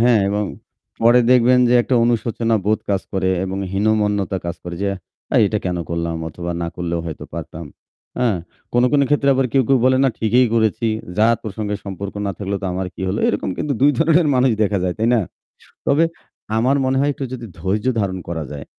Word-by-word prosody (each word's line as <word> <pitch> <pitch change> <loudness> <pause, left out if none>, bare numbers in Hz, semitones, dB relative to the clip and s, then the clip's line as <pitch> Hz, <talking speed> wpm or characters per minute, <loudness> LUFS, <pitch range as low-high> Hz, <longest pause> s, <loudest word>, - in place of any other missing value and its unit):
হ্যাঁ 120 -1 +5
এবং 105 +1 0 0.6
পরে 120 +2 +6
দেখবেন 125 0 +5
যে 125 - +3
একটা 130 - -1
অনুশোচনা 115 -1 0
বোধ 110 +1 +2
কাজ 95 -2 0
করে 95 -1 0
এবং 95 +1 -4
হীনমন্যতা 105 -2 +1
কাজ 85 - -3
করে, 85 -1 -6
যে 100 - +1 0.5
"এই - - +6
এটা 105 +1 -1
কেন 90 - -1
করলাম" 85 0 -2
অথবা 85 +2 -6
"না 85 - -2
করলেও 85 -1 -2
হয়তো 80 - -6
পারতাম।" 80 +1 -7 0.5
হ্যাঁ? 115 -6 +2 0.4
কোন, 120 - +3
কোন 145 - +4
ক্ষেত্রে 145 -1 +2
আবার 130 0 +2
কে 135 - +3
কেউ 135 - +4
বলে 130 0 +4
"না 135 - +5
ঠিকই 120 +3 +3
করেছি। 115 0 +1 0.3
যার 115 +2 +4
প্রসঙ্গে 105 -1 -4
সম্পর্ক 100 0 -6
না 100 - 0
থাকলেও 100 -1 -3
তো 95 - -1
আমার 95 0 -2
কি - - -7
হলো।" 100 - -1
এরকম 105 -2 -1
কিন্তু 145 - -1
২ 145 - +6
ধরনের 165 +1 +4
মানুষ 125 0 +3
দেখা 100 -1 +1
যায়। 90 -1 -1
তাই 110 +2 +1
না? 120 - +3 0.7
তবে 155 +4 +4 0.5
আমার 130 +5 +2
মনে 130 0 +1
হয় 140 +1 +2
একটু 140 - -6
যদি 120 -2 -6
ধৈর্য 100 +4 -1
ধারণ 95 -3 -1
করা 80 -2 -3
যায়, 70 -1 -7
110 Hz, 200 wpm, -20 LUFS, 95-125 Hz, 0.7 s, পরে